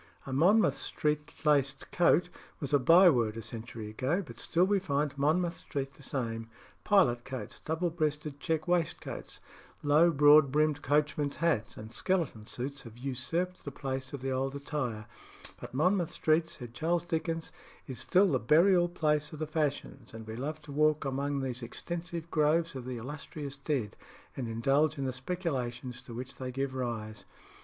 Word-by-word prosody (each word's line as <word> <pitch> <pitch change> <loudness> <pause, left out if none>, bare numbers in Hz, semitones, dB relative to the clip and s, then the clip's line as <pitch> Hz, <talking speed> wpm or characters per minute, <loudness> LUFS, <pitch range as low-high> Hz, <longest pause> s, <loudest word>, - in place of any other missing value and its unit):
"A 135 - -5
Monmouth 190 +11 +4
Street 150 0 -1
laced 140 -2 +2
coat" 175 0 +4 0.3
was 140 -1 -4
a 145 - +6
byword 130 - +5
a 115 - -5
century 115 0 -6
ago, 135 - -1
but 115 -4 -11
still 175 +2 +2
we 200 +1 +2
find 145 -5 -1
Monmouth 165 +5 +1
Street 135 -1 -4
the - - -17
same. 115 -4 -3 0.3
Pilot 130 -13 +4
coats, 130 -1 -7
double 165 +2 -1
breasted 150 -3 -2
check 160 +1 -1
waistcoats, 175 -2 -2 0.4
low 150 +4 +5
broad 145 -2 +6
brimmed 150 0 +2
coachmen's 145 0 +1
hats, 155 -10 0
and 110 +1 -9
skeleton 155 - -1
suits, 140 +3 -5
have 115 -1 -12
usurped 140 +8 -3
the - - -4
place 135 -1 -4
of 140 -3 -7
the 135 - -1
old 135 +1 -1
attire; 130 -7 -3 0.5
but - - -8
Monmouth 175 +3 +2
Street, 160 +1 +2
said 120 -2 -8
Charles 165 +6 0
Dickens, 165 -1 -2 0.3
is 130 -3 -5
still 190 0 +4
"the 130 - +2
burial 175 - +5
place 150 -3 0
of 155 - -8
the 155 - -2
fashions, 150 -6 -3
and 110 0 -8
we 110 0 -6
love 150 +6 -4
to 150 - -10
walk 150 +1 +2
among 140 +1 -1
these 130 -2 -3
extensive 170 +6 -5
groves 160 +2 +2
of 130 -3 -6
the 125 -1 -4
illustrious 145 +3 -6
dead, 140 -7 -2 0.4
and 125 -3 -3
indulge 135 +7 +2
in 135 - -2
the 130 - -1
speculations 130 -5 -3
to 120 -3 -10
which 130 +2 -7
they 130 -1 -4
give 135 +1 -2
rise." 115 -4 -4
145 Hz, 170 wpm, -31 LUFS, 130-160 Hz, 0.5 s, a